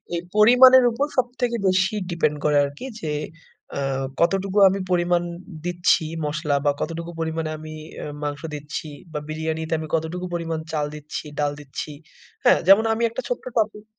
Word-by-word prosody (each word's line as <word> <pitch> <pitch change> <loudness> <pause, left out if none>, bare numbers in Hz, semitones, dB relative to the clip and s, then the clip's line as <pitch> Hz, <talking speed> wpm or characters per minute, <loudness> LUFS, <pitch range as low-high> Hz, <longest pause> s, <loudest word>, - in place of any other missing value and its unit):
এই 170 - -1
পরিমাণের 250 +4 +8
উপর 275 +5 0
সবথেকে 245 -1 0
বেশি 190 +3 +2
ডিপেন্ড 165 -3 +1
করে 150 -1 +4
আরকি 145 - -7 0.2
যে, 155 - -2 0.7
আ - - -1 0.4
কতটুকু 195 +3 +1
আমি 195 +1 -1
পরিমাণ 175 0 +2 0.4
দিচ্ছি 175 -2 +2 0.2
মসলা 150 -1 -1
বা 145 - +5
কতটুকু 170 +1 -4
পরিমাণে 160 -1 -2
আমি 155 0 -9 0.2
অ্যা - - -5 0.2
মাংস 145 -1 -3
দিচ্ছি 150 +1 -6 0.3
বা 150 - -2
বিরিয়ানিতে 160 +1 -2
আমি 155 - -5
কতটুকু 165 +3 -3
পরিমাণ 165 -2 -2
চাল 150 -2 0
দিচ্ছি, 150 +1 -6
ডাল 145 -1 +1
দিচ্ছি। 145 +1 -6 0.5
হ্যাঁ? - - +6
যেমন 195 +3 +8
আমি 230 +1 -1
একটা 230 - -4
ছোট্ট - - -2
টপিক 215 -1 0
170 Hz, 160 wpm, -23 LUFS, 155-200 Hz, 0.7 s, পরিমাণের